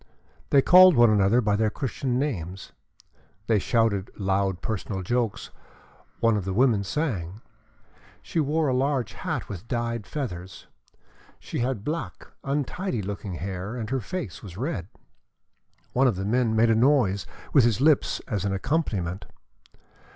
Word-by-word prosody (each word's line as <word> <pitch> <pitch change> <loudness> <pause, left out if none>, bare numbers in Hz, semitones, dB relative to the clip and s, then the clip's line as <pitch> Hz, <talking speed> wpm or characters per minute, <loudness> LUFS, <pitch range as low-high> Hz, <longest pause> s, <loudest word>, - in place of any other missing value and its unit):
They 140 -1 +5
called 185 -1 +8
one 120 -2 +6
another 105 +3 +4
by 105 -3 +1
their 110 +1 +2
Christian 130 0 -2
names, 95 - -3 0.7
they 110 -1 +2
shouted 105 -3 +1
loud 95 -2 0
personal 100 -3 -3
jokes, 120 +1 -2 0.7
one 115 -1 +3
of 105 - -1
the 95 +1 -3
women 115 -4 +3
sang. 100 - -3 0.8
She - - -2
wore 155 +1 +1
a 130 - +1
large 130 -2 0
hat - - -4
with 100 +3 -8
dyed 115 -2 -2
feathers. 95 - -6 0.7
She - - -6
had 120 -4 -1
black, 165 +2 -4 0.2
untidy 140 - -2
looking 100 -1 -5
hair, 95 +5 -5
and 115 -1 -5
her 135 -1 0
face 170 - -5
was 95 -4 -10
red. 110 - -3 1.1
One 130 +2 +4
of 120 - +1
the 95 +1 -4
men 115 +1 +1
made 115 +1 +4
a - - +4
noise 110 -7 +2 0.3
with 140 - +6
his 115 -2 +2
lips 150 +1 +3
as 105 -4 -3
an 100 -1 -1
accompaniment. 95 - -2
115 Hz, 150 wpm, -25 LUFS, 100-135 Hz, 1.1 s, called